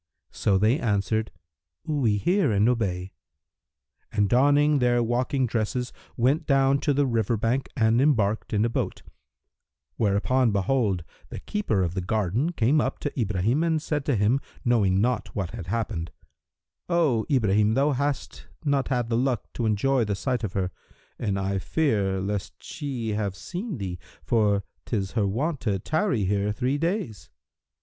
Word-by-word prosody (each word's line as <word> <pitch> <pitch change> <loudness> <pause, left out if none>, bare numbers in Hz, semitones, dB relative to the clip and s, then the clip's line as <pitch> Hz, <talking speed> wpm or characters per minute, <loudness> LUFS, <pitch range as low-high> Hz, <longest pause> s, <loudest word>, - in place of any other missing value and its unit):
"[FN#330] - - -24
So 95 - +2
they 110 +8 +3
answered, 110 0 0 0.5
"We 135 -10 +1
hear 175 - +2
and 105 +1 +3
obey," 95 -6 -1 1.0
and 105 -1 +2
donning 145 +5 +4
their 120 -1 +3
walking 125 +3 0
dresses 120 +2 -2 0.2
went 135 +7 +2
down 135 0 +3
to 145 0 +1
the 145 0 +3
river 115 -2 0
bank 120 +5 0
and 115 +1 +3
embarked 110 -7 +1
in 105 +1 +2
a - - +3
boat; - - -3 0.9
whereupon 115 +4 +2
behold, 100 -2 +1 0.3
the - - -6
keeper 115 - -1
of 85 -1 -2
the 95 - -2
garden 110 - 0
came 140 +3 +3
up 130 - -2
to 145 -2 -3
Ibrahim 105 - +1
and 165 -2 +1
said 150 -2 -2
to 140 - +1
him, 105 +6 +2 0.3
knowing 100 -6 +3
not 120 -3 -1
what 95 -3 -2
had 105 -7 -7
happened, 100 -5 -2 0.8
"O 155 -11 +2
Ibrahim, 105 -5 +3
thou 140 +3 +3
hast 140 +1 -3 0.2
not 140 -2 +1
had 125 -3 0
the 115 - 0
luck 125 -3 -1
to 115 - -1
enjoy 120 +5 +2
the 105 -2 -1
sight 125 +2 -2
of 100 -4 -3
her, 95 -2 -1 0.5
and 100 -4 -1
I 95 0 -1
fear 100 -8 0
lest 100 +1 -4
she 130 -7 -4
have 105 -2 -2
seen 185 - -5
thee, 90 -4 -5 0.2
for 105 -3 +2 0.2
'tis 100 -5 -2
her 105 -4 +1
wont 140 +9 -1
to 105 -4 0
tarry 155 - 0
here 100 +2 0
three 130 +6 -1
days." 165 - -2
115 Hz, 160 wpm, -26 LUFS, 100-135 Hz, 1.0 s, donning